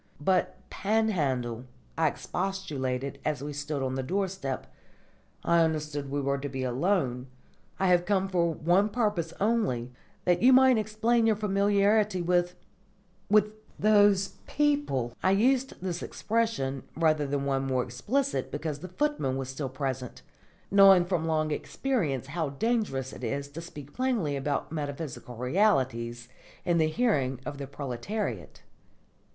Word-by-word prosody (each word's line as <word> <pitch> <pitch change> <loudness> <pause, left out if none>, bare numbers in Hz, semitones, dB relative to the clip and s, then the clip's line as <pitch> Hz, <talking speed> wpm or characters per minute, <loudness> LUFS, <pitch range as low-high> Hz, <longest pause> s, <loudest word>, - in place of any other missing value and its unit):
"But, 185 +5 +1
Panhandle," 145 - 0 0.3
I 160 -1 +2
expostulated 140 -8 -3
as 150 -3 -2
we 145 0 -4
stood 145 -1 -3
on 130 0 -1
the 130 - -1
doorstep, 185 -2 -2 0.8
"I 170 0 +3
understood 150 -3 -2
we 145 +1 -1
were 140 0 0
to 145 +1 -4
be 130 -1 -4
alone. 130 -1 0 0.5
I 190 - +1
have 175 -1 +3
come 195 -1 +2
for 175 -3 +1
one 175 +6 +2
purpose 205 -8 0
only, 200 - 0 0.3
that 175 -1 +3
you 255 +3 +7
might 260 -2 +6
explain 225 +2 +1
your 220 - +4
familiarity 205 0 +2
with 175 0 +1 0.7
with 210 0 +4 0.3
those 205 -2 +4 0.2
people." 285 - 0
I 190 - +3
used 255 +6 +2
this 180 -2 -3
expression, 215 - -1 0.2
rather 155 -3 +2
than 140 0 -1
one 135 -1 0
more 130 -1 +1
explicit, 255 - -1
because 150 0 -4
the 185 - -7
footman 185 - -1
was 135 -1 -4
still 135 0 -4
present, 130 -2 -4 0.5
knowing 195 -3 +7
from 175 -3 -1
long 155 -1 0
experience 155 - -1
how 155 +2 -2
dangerous 140 - -1
it - - -10
is 140 +4 -2
to 155 +4 -7
speak 145 -4 -10
plainly 235 - 0
about 140 +2 -2
metaphysical 145 -4 -5
realities 125 - +1 0.4
in 175 -2 +2
the 160 - +4
hearing 155 - +1
of 145 -1 -5
the 140 - -5
proletariat. 135 - -5
160 Hz, 140 wpm, -28 LUFS, 135-205 Hz, 0.8 s, you